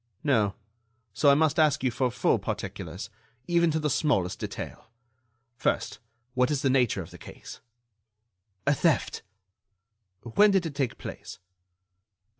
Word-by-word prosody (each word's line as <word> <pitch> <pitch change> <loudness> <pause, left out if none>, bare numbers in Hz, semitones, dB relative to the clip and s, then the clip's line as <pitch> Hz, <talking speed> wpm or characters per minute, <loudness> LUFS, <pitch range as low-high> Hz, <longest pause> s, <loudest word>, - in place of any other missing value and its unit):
"No; 110 -9 +2 0.6
so 145 - +4
I 140 - +7
must 155 +1 +2
ask 155 -2 +3
you 130 - +2
for 125 +2 0
full - - +1
particulars, 105 +5 -5 0.4
even 170 -1 +3
to 160 0 0
the 150 - 0
smallest 125 - +1
detail. - - -7 0.7
First, - - -1 0.3
what 125 +1 +2
is 145 -1 -1
the 135 - +3
nature 125 -7 +2
of 80 - -14
the - - -12
case?" - - -11 1.0
"A 140 - +4
theft." 155 -1 +1 1.0
"When 160 - +4
did 195 -3 +2
it 160 - -4
take 135 -4 -2
place?" - - -8
140 Hz, 140 wpm, -27 LUFS, 120-155 Hz, 1.0 s, I